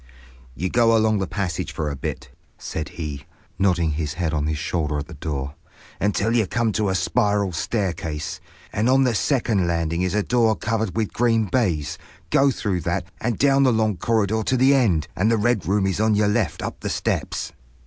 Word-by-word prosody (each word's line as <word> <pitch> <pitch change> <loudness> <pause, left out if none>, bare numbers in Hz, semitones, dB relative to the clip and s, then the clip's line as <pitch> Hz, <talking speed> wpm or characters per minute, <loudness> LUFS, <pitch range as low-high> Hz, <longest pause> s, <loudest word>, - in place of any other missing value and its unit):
"You 90 - -2
go 115 -1 +4
along 110 -1 +2
the 95 - -1
passage 95 -4 -3
for 75 -2 -3
a - - -4
bit," 65 - -5 0.3
said 75 -2 -5
he, 75 -4 -5 0.3
nodding 90 -4 +2
his 75 0 -3
head 85 -2 -1
on 75 -1 0
his 80 -1 -1
shoulder 75 -1 -1
at 75 - -3
the 85 - -11
door, 70 -3 -4 0.5
"until 105 +2 +1
you 110 -5 +2
come 115 +1 0
to 105 -1 0
a 95 - 0
spiral 105 -2 +1
staircase; 85 -4 -3 0.3
and 110 +4 +1
on 135 +1 +5
the 125 -2 +2
second 110 - +1
landing 85 0 0
is 90 +1 0
a 105 - +2
door 115 -2 +2
covered 110 -4 -2
with 110 -3 -1
green 115 -2 +2
baize. 90 - -1 0.3
Go 140 +1 +5
through 100 -8 -1
that, 90 +2 -2
and 115 -2 -1
down 140 0 +4
the 130 -2 +5
long 110 -2 +1
corridor 110 +1 +1
to 130 +4 0
the 130 +3 +5
end, 100 - +2
and 105 +4 +2
the 115 - +3
Red 110 -2 +1
Room 100 +1 +2
is 95 0 -1
on 110 0 +3
your 105 0 +3
left 105 -6 0
up - - -5
the - - -4
steps." - - -2
100 Hz, 200 wpm, -23 LUFS, 85-115 Hz, 0.5 s, on